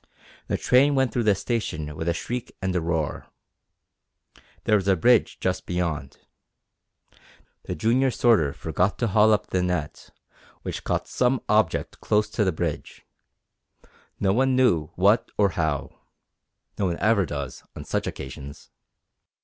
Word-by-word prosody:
The - - 0
train 140 +3 +4
went 130 -2 +1
through 120 -2 0
the 105 -2 +4
station 90 -9 -3
with 80 +2 -2
a - - +2
shriek 125 +6 -5
and 95 -2 -2
a 90 - +1
roar. 80 -4 -2 1.4
There 105 - +3
was 100 -1 -3
a 95 - +4
bridge 120 +6 +3
just 90 0 -2
beyond. 85 -6 -3 1.5
The - - -4
junior 125 - +2
sorter 110 - +3
forgot 90 +7 -1
to 120 - 0
haul 105 +2 +5
up 105 - 0
the 90 - +1
net, 90 -4 -3 0.5
which - - -5
caught - - -1
some 125 +1 +1
object 105 -5 +1
close 105 0 +1
to 110 - +1
the 95 - +2
bridge 80 -2 -5 1.1
no 95 -1 +2
one 130 +3 +2
knew 90 - +3
what 100 +5 +3
or 100 -1 +4
how. 80 -6 -2 0.8
No 100 - +1
one 85 -1 -2
ever 105 -3 +2
does 70 -3 -6
on - - -8
such - - -2
occasions! 70 +2 -8
95 Hz, 150 wpm, -25 LUFS, 80-115 Hz, 1.5 s, haul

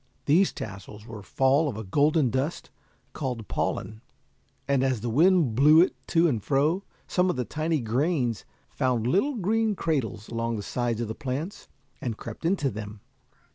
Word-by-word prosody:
These 175 +7 +4
tassels 105 +1 -8
were 115 -3 -8
fall 135 - +2
of 110 - -5
a 110 - -5
golden 145 - +2
dust 135 +6 -2 0.4
called 125 -7 -4
pollen, 110 0 -3 0.7
and 140 -2 +2
as 130 -5 0
the 120 0 -2
wind 165 -1 +4
blew 150 +6 +6
it 180 - +3
to 170 0 +3
and 115 -10 -1
fro, 150 +7 +1 0.2
some 180 0 +1
of - - 0
the 125 -1 -2
tiny 155 0 -1
grains 120 - 0 0.3
found 125 -4 0
little 200 - +2
green 220 +1 +1
cradles 130 - -2
along 115 0 -2
the 105 - -4
sides 120 +1 -2
of 115 - -2
the 110 - -4
plants, 140 - -5 0.3
and 115 -4 -3
crept - - -8
into 165 -7 +1
them. 105 -1 -8
130 Hz, 170 wpm, -26 LUFS, 115-160 Hz, 0.7 s, blew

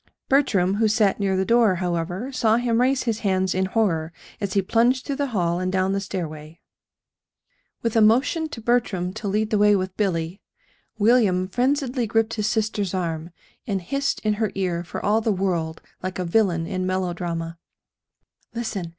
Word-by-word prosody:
Bertram, 200 -9 +2
who 220 0 +3
sat 215 -2 +2
near 195 -2 +1
the 190 - +1
door, 230 -4 +4
however, 180 +6 -2
saw 225 -4 +2
him 240 -1 +1
raise 260 +1 +2
his 230 -3 -1
hands 190 -2 +1
in 190 +1 +1
horror 185 -6 0 0.3
as 200 -2 -3
he 195 - +2
plunged 240 +6 +2
through 280 -2 -3
the 285 -1 0
hall 175 -7 0
and 185 0 -1
down 190 0 +1
the 195 - 0
stairway. 160 -4 -6 1.2
With 230 -1 -1
a 225 - +5
motion 265 +9 +3
to 230 - -8
Bertram 215 -6 0
to 205 - -5
lead 210 +2 0
the 210 - +2
way 210 0 +5
with 185 -1 -2
Billy, 180 -2 -1 0.6
William 205 -5 +3
frenziedly 255 +2 0
gripped 225 +1 +1
his 210 -1 -1
sister's 215 -4 -1
arm, 165 -2 -3 0.4
and 200 -3 0
hissed 275 +10 -2
in 215 -1 +1
her 215 - +1
ear 180 -3 -1
for 175 - -6
all 215 +2 +3
the 220 - +1
world 175 -5 -2 0.2
like 185 0 -4
a 180 - -2
villain 170 -3 +2
in 185 0 -2
melodrama: 175 -3 -3 1.0
"Listen! 220 -7 -3
200 Hz, 175 wpm, -23 LUFS, 180-225 Hz, 1.2 s, a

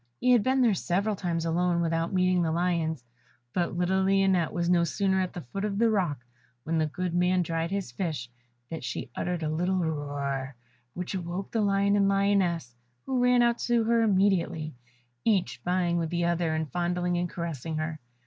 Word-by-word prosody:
He 250 - +3
had 245 -3 +6
been 260 +4 +2
there 230 -4 +4
several 195 +4 0
times 170 -3 -2
alone 170 +1 +1
without 165 0 0
meeting 185 -1 +2
the 165 -2 +1
lions, 165 -4 0 0.5
but 175 -1 -1
little 185 +2 +2
Lionette 190 -3 +2
was 170 -1 -1
no 175 -1 +4
sooner 190 +2 +1
at 185 - -3
the 175 - -6
foot 165 +11 -5
of 205 -2 -1
the 230 +1 +3
rock 160 - -1 0.4
where 165 - -2
the 155 -1 +2
good 175 +4 -3
man 180 +1 +2
dried 165 0 -2
his 195 -7 -3
fish 145 -3 -3 0.4
than 165 - -4
she 125 - -5
uttered 175 -2 -2
a - - 0
little 180 +4 0
roar, 145 -5 -2 0.4
which 180 +2 -4
awoke 180 +1 -4
the 225 - +1
lion 200 0 +2
and 200 -1 +3
lioness, 195 -9 +1 0.3
who 260 -2 0
ran 250 -1 +5
out 235 0 +2
to 240 -1 +2
her 230 +1 +3
immediately, 185 -6 +1 0.5
each 205 -5 +1
vying 175 -1 +1
with 165 -2 -1
the 175 0 0
other 170 -2 0
in 160 0 -1
fondling 175 +3 -1
and 175 0 -1
caressing 165 -3 -4
her. 155 0 -3
175 Hz, 190 wpm, -28 LUFS, 165-195 Hz, 0.5 s, had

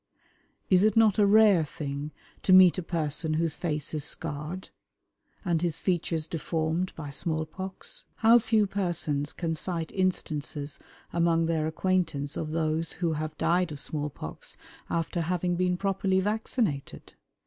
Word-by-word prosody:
Is 185 0 +5
it 215 0 +3
not 220 -3 +5
a 205 - +5
rare 205 -4 +6
thing 145 -1 -5 0.3
to - - +1
meet 185 -1 +8
a - - -2
person 155 -2 -1
whose 160 -1 +1
face 150 -4 -3
is 150 -2 -1
scarred 155 +5 -4 0.8
and 170 -3 +1
his 170 -3 -1
features 170 -3 -1
deformed 165 +2 -1
by 150 -3 -6
small 155 +2 -2
pox? 185 +4 -7
How 230 +2 +6
few 220 -2 +2
persons 170 -7 -2
can 165 -2 -2
cite 165 0 -3
instances 150 -6 -2 0.3
among 170 -1 +2
their 160 -1 0
acquaintance 160 -4 0
of 155 - -3
those 160 0 0
who 170 -1 -1
have 155 0 -4
died 175 -1 +1
of 145 - -6
small 150 +1 -3
pox 75 - -8 0.3
after 170 +1 -1
having 175 +1 0
been 180 0 +1
properly 195 0 +1
vaccinated? 210 - -2
165 Hz, 150 wpm, -28 LUFS, 155-185 Hz, 0.8 s, meet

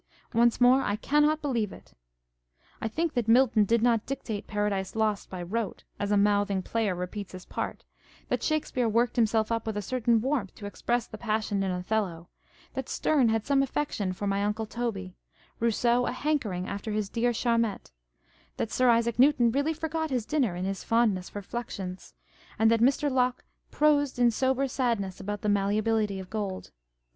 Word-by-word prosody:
Once 235 0 +3
more, 250 +2 +6
I 205 - 0
cannot 295 +6 +2
believe 235 -8 0
it. - - -14 0.9
I - - -1
think 315 +7 -1
that 240 -3 -1
Milton 230 -2 +5
did 230 +2 +2
not 230 -3 +2
dictate 240 -6 -4
Paradise 205 -2 -1
Lost 215 -2 0
by 180 -2 -5
rote 215 +4 -3 0.2
(as 205 - -1
a 205 - +4
mouthing 200 -1 +2
player 220 -4 -1
repeats 180 +3 -6
his 185 -1 -9
part), - - -5 0.4
that - - -1
Shakespeare 275 -6 0
worked 235 +2 +1
himself 225 -1 +2
up 230 0 -1
with 220 -2 -2
a - - -1
certain 235 +1 +2
warmth 250 -5 -1
to 205 - -9
express 235 +4 -1
the 215 - -10
passion 215 -3 -1
in 195 - 0
Othello, 180 -2 -2 0.4
that - - -4
Sterne 275 -7 +2
had 220 -1 0
some 275 -1 +3
affection 270 -8 -1
for 185 +3 -5
My 200 0 0
Uncle 210 +2 -1
Toby, 210 -5 -4 0.5
Eousseau 235 +2 +2
a - - 0
hankering 245 -10 -1
after 200 +2 -4
his 210 -1 -1
dear 235 +4 0
Charmettes, 230 - 0 0.7
that 225 - -2
Sir 255 -1 +3
Isaac 235 0 +2
Newton 255 -3 +5
really 285 +5 +1
forgot 320 0 -2
his 250 -5 -1
dinner 260 -11 0
in 180 +1 -3
his 195 0 -3
fondness 220 -6 +1
for 205 - -7
fluxions, 190 - -6 0.4
and 225 +1 +4
that 230 - +3
Mr. 280 +3 +3
Locke 250 -1 +1 0.2
prosed 290 -3 +2
in 240 -1 +4
sober 265 +3 +1
sadness 230 -8 -1
about 205 +1 -4
the 210 - 0
malleability 205 0 +1
of 185 -1 -9
gold. 200 -4 -4
225 Hz, 180 wpm, -28 LUFS, 205-250 Hz, 0.9 s, more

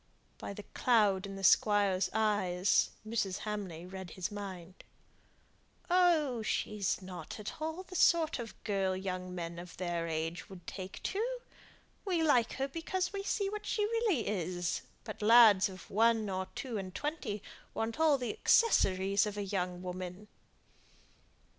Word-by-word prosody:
By - - -5
the 210 - -8
cloud 205 -6 +3
in 195 - -7
the 195 - -7
Squire's 200 -2 +4
eyes, 205 -4 +2 0.2
Mrs. 205 -4 -1
Hamley 195 -6 -4
read 190 -1 -8
his 185 +2 -4
mind. 190 -3 -8 1.1
"Oh, 320 -9 +3
she's 210 -3 -1
not 185 +3 -8
at 210 +8 -7
all 320 +4 -3
the 370 0 -11
sort 330 -4 +3
of 230 -2 -8
girl 195 -3 0
young 185 -1 -4
men 170 -1 -5
of 175 0 -10
their 175 -2 -2
age 165 +1 -3
would 180 -3 -11
take 190 -1 -7
to. 405 +3 -1 0.8
We 355 -5 0
like 245 -7 +3
her 270 +1 -1
because 360 +6 -2
we 400 - -2
see 400 0 -1
what 425 0 -6
she 420 - +1
really 435 - +1
is; 180 -3 -2 0.2
but - - -8
lads 215 -3 +7
of 185 -1 -11
one 225 +1 +3
or 185 0 -2
two 240 -6 -3
and 185 -1 -7
twenty 295 -9 -3 0.3
want 225 +6 -2
all 310 -3 +5
the 250 +5 -3
accessories 200 - +3
of 210 0 -5
a 205 - -1
young 180 -2 -3
woman." 185 +2 -6
205 Hz, 155 wpm, -32 LUFS, 185-265 Hz, 1.1 s, lads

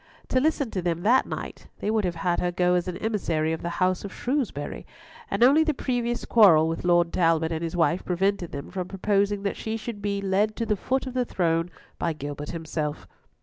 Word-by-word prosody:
To 255 - +3
listen 285 -4 0
to 185 - -2
them 170 -1 -2
that 245 +5 +4
night, - - -7
they 210 - -2
would 220 -2 +1
have 175 -1 -1
had 175 +1 0
her 180 - 0
go 180 0 +2
as 180 0 +1
an 180 -1 -3
emissary 170 -8 -1
of 160 - -4
the 170 - -3
house 185 0 +1
of 200 - -6
Shrewsbury, 245 - -3 0.5
and - - +1
only 285 +6 +6
the 310 -2 0
previous 240 -2 -2
quarrel 170 -9 +6
with 165 0 -3
Lord 175 -1 +3
Talbot 165 -2 +2
and 160 0 -2
his 165 +1 -3
wife 170 +1 +2
prevented 185 0 0
them 140 -1 -7
from 185 -2 -4
proposing 200 +1 0
that 200 - -2
she 220 0 -3
should 225 -2 -6
be 200 0 -1
led 200 +2 +1
to 230 - -2
the 215 - +1
foot 265 +7 -1
of 260 - -6
the 255 -1 +1
throne 165 -6 0 0.3
by 170 - 0
Gilbert 145 0 -6
himself. 155 -2 -4
185 Hz, 220 wpm, -26 LUFS, 165-220 Hz, 0.5 s, only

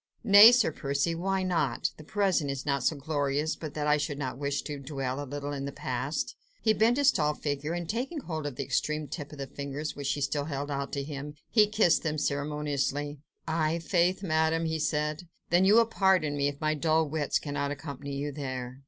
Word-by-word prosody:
"Nay, 210 +1 +10
Sir 240 -9 +3
Percy, 140 +3 -1
why 190 +3 -1
not? 165 -9 0
the 155 - -11
present 185 -4 +1
is 135 0 -4
not 140 -2 0
so 155 - +2
glorious 145 +1 -1
but 155 -3 -7
that 150 -1 -2
I 150 0 +4
should 145 -1 -3
not 130 -3 -3
wish 140 0 -1
to 145 -2 -5
dwell 135 -1 -3
a 140 - -9
little 145 +1 -4
in 140 -1 -4
the 140 - -4
past." 130 +3 -3 0.2
He 220 - +3
bent 225 +4 +3
his 285 -1 +5
tall 150 -1 0
figure, 145 +2 -3
and 175 -1 -3
taking 265 - -3
hold 155 - -4
of 140 - -6
the 140 - -3
extreme 150 +2 -1
tip 145 +2 -6
of 150 - -10
the 140 - -4
fingers 140 +2 -5
which 140 -1 -4
she 145 +1 -1
still 140 +1 -1
held 145 -1 -4
out 140 0 -3
to 140 - -2
him, 145 0 -6 0.2
he 215 -2 +5
kissed 210 -5 +3
them 155 -2 -2
ceremoniously. 145 0 -1 0.3
"I' 160 0 +1
faith, 180 +3 +1
Madame," 160 -1 +1
he 160 0 -1
said, 150 +2 -1 0.2
"then 175 +2 +5
you 200 +3 +6
will 230 0 +7
pardon 190 -9 +2
me, 140 0 +1
if 145 0 -4
my 155 0 +1
dull 160 +1 +2
wits 150 -1 0
cannot 145 -1 -3
accompany 140 -1 -6
you 145 +1 -3
there." 130 -3 -5
150 Hz, 215 wpm, -29 LUFS, 140-165 Hz, 0.3 s, Nay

